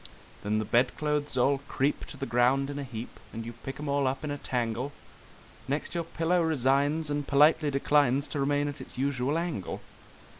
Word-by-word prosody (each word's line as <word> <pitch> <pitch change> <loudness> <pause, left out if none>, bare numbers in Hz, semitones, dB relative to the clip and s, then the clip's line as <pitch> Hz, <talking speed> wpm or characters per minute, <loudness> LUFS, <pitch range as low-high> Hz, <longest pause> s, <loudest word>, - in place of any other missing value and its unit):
Then 105 +1 0
the 110 - 0
bedclothes 145 +5 +1
all 135 +3 +3
creep 140 +3 0
to - - -10
the 135 - -3
ground 125 +4 +2
in 145 - -5
a - - -3
heap, 120 -3 -7
and 115 0 -6
you 120 - -6
pick 135 +4 -8
'em 150 - -4
all 140 -1 +2
up 130 +3 -2
in 150 - -2
a 145 - -4
tangle; 125 +3 -2 0.7
Next 145 +5 -2
your 170 -1 -1
pillow 170 +2 +1
resigns 145 0 +2
and 145 -1 -2
politely 150 +2 +5
declines 140 -1 +3
to 145 - -3
remain 145 +1 +1
at 145 0 -5
its - - -10
usual 135 +2 0
angle! 165 - -3
140 Hz, 190 wpm, -29 LUFS, 125-150 Hz, 0.7 s, politely